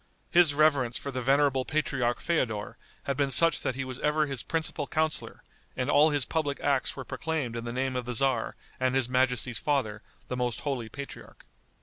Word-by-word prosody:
His 170 -5 +5
reverence 140 -5 +3
for 140 - -5
the 130 -1 -3
venerable 135 0 +3
patriarch 135 -5 0
Feodor, 115 -11 -1 0.3
had 140 - -1
been 140 0 +1
such 165 +4 +4
that 130 - -1
he 135 0 -3
was 130 0 -6
ever 150 +1 +2
his 135 -4 -4
principal 160 -3 -2
counselor, 155 -1 -1 0.3
and 125 -1 0
all 150 +2 +6
his 145 -4 +1
public 145 -3 -1
acts 140 -2 +1
were 130 - -6
proclaimed 155 -8 -3
in 115 0 -4
the 120 - -3
name 130 +1 -1
of 125 -1 -2
the 125 - -3
tzar 130 -1 +1 0.2
and 130 0 +1
his 135 -3 +2
majesty's 125 -2 +1
father, 120 -8 0 0.3
the 125 - -3
most 125 -2 -2
holy 130 -6 -3
patriarch. 140 +5 -10
135 Hz, 195 wpm, -28 LUFS, 125-145 Hz, 0.3 s, all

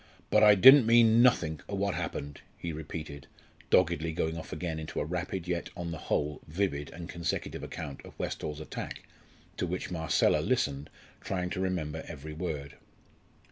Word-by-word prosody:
"But 105 - +5
I 105 -1 +8
didn't 130 +4 +9
mean 115 0 +6
nothink 80 - +3
o' 100 - -2
what 100 0 0
happened," 75 -3 -5 0.2
he 85 -1 -4
repeated, 75 -2 -7 0.4
doggedly 80 +2 +3
going 80 -1 -1
off 80 - -7
again 80 -3 -3
into 80 - -5
a - - -1
rapid 90 +2 -3
yet, 85 -1 -2
on 85 -2 -4
the 80 - -5
whole, 75 0 0
vivid 75 -4 -2
and 85 0 -8
consecutive 85 -2 -3
account 70 -1 -7
of - - -13
Westall's 75 0 -4
attack, 80 - -6 0.5
to 90 - -1
which 90 +1 -4
Marcella 80 -3 +2
listened, 70 0 0 0.3
trying 90 -2 -2
to 95 - -3
remember 85 -5 -2
every 75 -1 -8
word. 75 -4 -5
85 Hz, 165 wpm, -30 LUFS, 75-95 Hz, 0.5 s, didn't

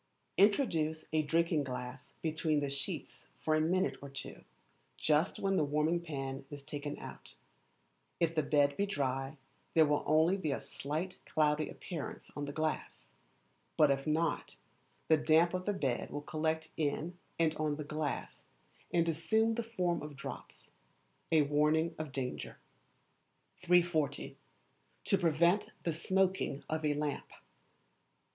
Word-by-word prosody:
Introduce 165 - +3
a 155 - +4
drinking 165 0 +2
glass 125 0 -6
between 155 -1 +1
the 145 -1 -2
sheets 140 -1 -5
for 155 - +1
a 155 - +3
minute 185 +4 +1
or 140 - -7
two, 135 - -8 0.5
just 155 +4 +2
when 195 -1 +1
the - - +4
warming 150 +4 +2
pan 135 -5 -4
is 145 -1 -8
taken 145 0 -5
out; - - -10 0.8
if 165 -1 +2
the 155 - +2
bed 145 -1 +3
be 200 - 0
dry, 135 -3 -1 0.4
there 160 -1 +7
will 145 0 +2
only 160 +5 +4
be 160 -6 -1
a - - -1
slight 155 +6 -4
cloudy 150 0 +2
appearance 165 -5 -6
on 145 - -3
the 145 - -4
glass, 155 +1 -3 0.7
but 150 -2 +6
if 135 +2 -1
not, 160 +2 0 0.5
the 160 - +6
damp 160 +3 +4
of 185 0 -2
the 205 - +2
bed 135 -10 -1
will 145 0 -5
collect 160 +1 -1
in 160 +3 -1 0.2
and 160 -2 +3
on 155 -1 0
the 150 - -4
glass 150 -1 -3 0.5
and 170 -1 +3
assume 220 +8 +2
the 235 - -1
form 185 -7 -1
of 150 -1 -7
drops 140 - -9 0.6
a 160 -2 +6
warning 150 +3 +2
of 155 -3 -4
danger. 130 -2 -4 1.0
340. 170 -5 +2 0.7
To 195 - +3
prevent 170 +3 +3
the 165 - 0
Smoking 185 -3 +1
of 155 0 -2
a 150 -1 +2
Lamp. 145 -1 -2
155 Hz, 145 wpm, -33 LUFS, 145-170 Hz, 1.0 s, there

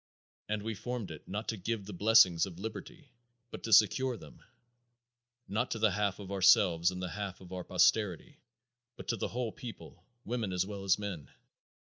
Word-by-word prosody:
And 105 -1 -2
we 110 +1 -3
formed 120 -2 -5
it, 80 - -11
not 105 +3 -4
to 110 - -2
give 105 +1 -3
the 105 - -8
blessings 95 -3 +5
of 85 -3 -10
liberty, 120 - -8 0.4
but - - -7
to 115 - -5
secure 120 +5 +5
them; 80 -6 -14 1.1
not 110 +6 -1
to - - -2
the 110 -1 +3
half 100 0 0
of 100 -2 -9
ourselves 90 -3 +5
and 90 0 -5
the 90 -1 -3
half 100 0 -5
of 95 -1 -12
our 90 -1 -4
posterity, 100 -4 +1 0.6
but - - -11
to 120 - +1
the 110 - -2
whole 120 -2 -3
people 120 0 -10 0.2
women 115 -5 -2
as 90 0 +1
well 100 -1 -7
as 95 -1 +4
men. 100 -8 -6
100 Hz, 185 wpm, -32 LUFS, 95-110 Hz, 1.1 s, blessings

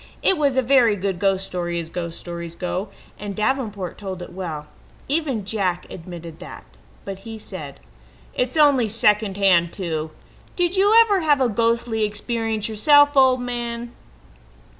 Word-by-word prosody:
It 385 - +4
was 285 -5 +1
a 260 - +3
very 245 -4 +4
good 190 -2 -3
ghost 195 -1 +1
story 175 -2 -3
as 165 -1 -7
ghost 170 -1 -5
stories 170 -1 -7
go, 185 +3 -3 0.3
and 205 -1 -5
Davenport 215 -6 -2
told 190 -3 -6
it - - -11
well. 165 -5 -5 0.4
Even 275 -8 -1
Jack 190 -4 -1
admitted 170 -2 -9
that, - - -10 0.4
but 195 -1 -6
he 225 +2 -8
said: 215 - -7 0.5
"It's 250 +4 -1
only 285 -6 +5
second 210 -2 +3
hand 175 -4 +3
too. 160 -5 -4 0.5
Did 355 +1 0
you 410 +4 +5
ever 415 -4 +3
have 300 -4 +3
a 260 - +3
ghostly 230 0 0
experience 220 +1 -2
yourself, 290 +7 +5
old 260 -2 +5
man?" 240 -1 -4
215 Hz, 155 wpm, -22 LUFS, 185-255 Hz, 0.5 s, only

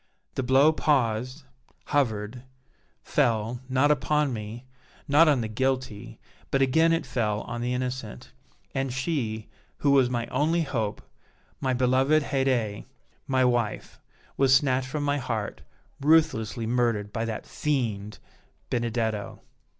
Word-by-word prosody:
The - - -1
blow 135 +4 +5
paused 130 -2 0 0.4
hovered 115 -4 -1 0.6
fell, 115 +1 0
not 130 +3 +3
upon 150 -1 +1
me, 110 +3 -7 0.4
not 155 +3 +6
on 145 -5 +3
the 110 - -2
guilty, 130 -2 -2 0.3
but 135 - +1
again 160 +5 +4
it 165 0 +1
fell 110 -4 -1
on 120 0 -5
the 125 +1 -1
innocent; 125 - -5 0.4
and 135 -1 -1
she, 125 -6 -2 0.3
who 140 - +2
was 135 -3 +5
my 120 -2 -1
only 165 +3 +1
hope, 115 -8 -3 0.6
my 130 -1 0
beloved 130 +4 +3
Haydée, 130 -7 0 0.4
my 130 -1 +3
wife, 120 -3 -1 0.4
was 135 -1 +5
snatched 130 -2 +2
from 150 +2 -3
my 145 0 +1
heart, 115 -5 -4 0.4
ruthlessly 135 -7 +2
murdered 115 -3 0
by 115 - -1
that 115 -1 -4
fiend, 110 -8 -2 0.5
Benedetto!" 115 -4 -2
125 Hz, 125 wpm, -26 LUFS, 115-140 Hz, 0.6 s, not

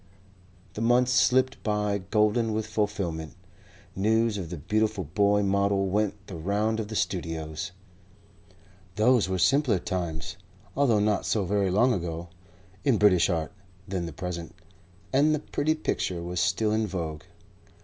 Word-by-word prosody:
The 105 - -5
months 120 +2 +3
slipped 130 +1 +3
by 105 -1 0
golden 105 +3 +1
with 110 0 -1
fulfilment. 100 -8 -2 0.6
News 110 +2 +1
of 85 -4 -6
the 90 - -5
beautiful 110 +5 0
boy 100 +5 +2
model 100 0 +1
went 105 -1 -1
the 95 - -8
round 105 +6 0
of 110 - -3
the 110 - -6
studios. 80 -1 -3 1.2
Those 110 -1 +3
were 95 - 0
simpler 125 - +3
times 90 0 -4 0.4
(although 130 -6 +3
not 105 -1 +1
so 105 -4 +1
very 100 +1 +1
long 120 +7 +3
ago) 85 -2 -4 0.5
in 135 -6 +3
British 100 -4 +4
art 80 -1 -1 0.4
than 90 -3 -3
the - - -6
present, 85 +1 -6 0.6
and 150 +3 +4
the - - -3
pretty 150 +1 -1
picture 90 - -2
was 90 0 -3
still 110 +4 +1
in 110 0 +1
vogue. 80 -5 -4
100 Hz, 145 wpm, -27 LUFS, 90-110 Hz, 1.2 s, British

